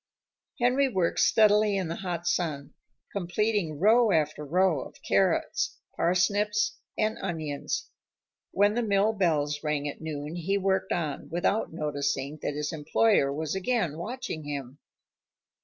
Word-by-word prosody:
Henry 255 +3 +3
worked 185 -7 0
steadily 210 -2 +4
in 185 -3 -1
the 165 - -4
hot 175 -3 -4
sun, 150 -5 -1 0.4
completing 195 -3 -1
row 220 +4 +5
after 155 -2 +1
row 170 0 +2
of - - -10
carrots, - - +1 0.2
parsnips, 205 +4 +1 0.2
and 215 +1 0
onions. 155 -6 -3 0.6
When 205 +1 +3
the 240 - 0
mill 210 0 +2
bells 150 -7 0
rang 150 -2 -1
at 145 - -6
noon 155 0 -5
he 190 +4 0
worked 190 -1 0
on, 155 -5 -2
without 175 +6 0
noticing 145 -2 -2
that 145 - -2
his 150 +1 -3
employer 155 0 +2
was 155 +1 -3
again 190 - -1
watching 235 -4 -5
him. 140 -2 -6
175 Hz, 135 wpm, -28 LUFS, 150-205 Hz, 0.6 s, row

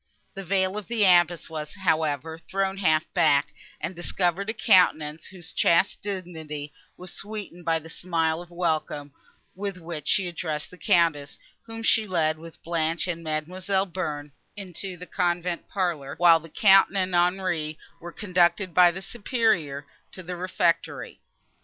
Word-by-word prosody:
The 195 - -7
veil 190 +2 +1
of 210 - -11
the 230 -3 +2
abbess 175 -2 +4
was, 155 0 -6
however, 160 -4 0
thrown 195 0 -1
half 160 -4 +2
back, 155 -5 +3 0.3
and 170 +4 -4
discovered 175 +3 -1
a - - +3
countenance, 165 -8 +3
whose 175 -4 -9
chaste 170 +4 +3
dignity 160 -7 -5 0.2
was 180 0 -7
sweetened 200 -4 -6
by 165 -1 +2
the 160 0 -9
smile 165 -2 -1
of 175 - -12
welcome, 155 -4 -2 0.4
with 195 0 -5
which 165 -3 -7
she 190 -2 +2
addressed 160 -3 -4
the 180 - -13
Countess, 155 -5 +2 0.3
whom 225 0 -7
she 220 -1 +3
led, 160 -4 +1
with 165 0 -13
Blanche 165 -1 0
and 170 -2 -4
Mademoiselle 185 +5 -1
Bearn, 150 -6 -4 0.3
into 190 -1 -6
the 180 - -8
convent 175 -1 -1
parlour, 170 -8 -2
while 170 0 +6
the 165 +1 -13
Count 195 +3 +6
and 185 -1 0
Henri 175 -3 +1 0.2
were 175 +1 -8
conducted 180 -1 +1
by 180 +1 +7
the 185 +2 -6
Superior 200 - 0 0.3
to 185 - -9
the 180 +1 -5
refectory. 175 -1 -1
175 Hz, 155 wpm, -26 LUFS, 160-190 Hz, 0.4 s, by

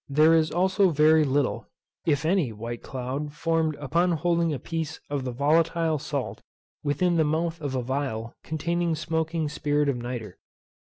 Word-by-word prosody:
There 155 +3 +5
is 160 -1 +4
also 190 +2 +3
very 155 0 +5
little, 140 -1 0 0.4
if 145 -2 +2
any 165 -7 +2
white 115 +2 -6
cloud 135 +3 -4
formed 160 0 0
upon 165 +5 +1
holding 170 0 +1
a 145 - -1
piece 160 +3 -4
of 140 -3 -2
the 125 - -2
volatile 160 +4 +2
salt 125 -8 -4 0.4
within 170 +4 +1
the 160 - +4
mouth 160 +2 -1
of 140 -3 -3
a 125 - -1
phial 130 -4 -3
containing 170 +2 -1
smoking 160 0 -1
spirit 145 0 0
of 135 - 0
nitre. 120 -5 -6
155 Hz, 160 wpm, -26 LUFS, 135-165 Hz, 0.4 s, There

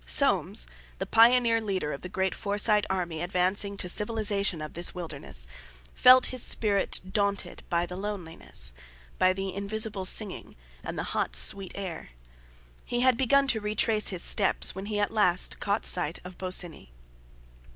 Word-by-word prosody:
Soames, - - +4 0.3
the - - -4
pioneer 230 0 +4
leader 190 -8 -3
of 140 - -8
the 180 - -8
great 190 0 -1
Forsyte 210 0 0
army 175 -4 -3
advancing 185 +3 -1
to - - -2
the - - -4
civilization 205 -4 -1
of 155 0 -7
this 175 +2 +1
wilderness, 160 - -3 0.5
felt 255 0 +6
his 255 - +2
spirit 205 -4 +2
daunted 200 -1 -2
by 170 -1 0
the 180 +1 -8
loneliness, 180 - -3 0.5
by 185 - +4
the 190 0 -4
invisible 200 0 -1
singing, 205 +1 -1 0.3
and - - -6
the - - -2
hot, - - -2
sweet 195 -2 0
air. 185 - -7 0.7
He 240 0 -2
had 255 -1 +4
begun 275 +3 +2
to 220 -4 +1
retrace 210 +1 +1
his 185 -3 0
steps 200 - +2
when 190 +2 -7
he 210 -1 -2
at 205 - 0
last 185 -5 +2
caught 200 +2 -1
sight 175 -2 +3
of 180 0 -10
Bosinney. 180 - -1
200 Hz, 160 wpm, -27 LUFS, 180-215 Hz, 0.7 s, felt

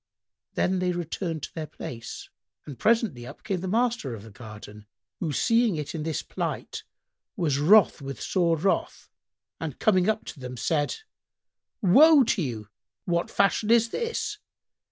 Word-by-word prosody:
Then 185 0 +1
they 180 0 0
returned 170 -2 -4
to - - -6
their 160 -2 -5
place 115 -5 -8 0.4
and 140 -4 -9
presently 215 - +1
up - - -12
came 195 -4 -2
the 190 - -4
master 225 - 0
of 105 - -11
the 110 - -12
garden, 105 -1 -11 0.3
who, 165 -4 -2
seeing 230 - +2
it 150 -2 -4
in 160 - -4
this 160 0 -2
plight, - - -4 0.5
was 145 -5 0
wroth 195 +3 +5
with 135 -2 -6
sore 170 -3 +1
wrath 190 +6 -1 0.5
and - - -5
coming 185 -3 +3
up 220 0 -1
to 150 - -9
them 125 -1 -7
said, 145 +4 0 0.9
"Woe 285 - +7
to 225 -4 0
you! 110 -8 -4 0.4
What 170 -1 0
fashion 200 +2 +1
is 230 0 +5
this? 460 -3 -3
170 Hz, 155 wpm, -26 LUFS, 135-215 Hz, 0.9 s, Woe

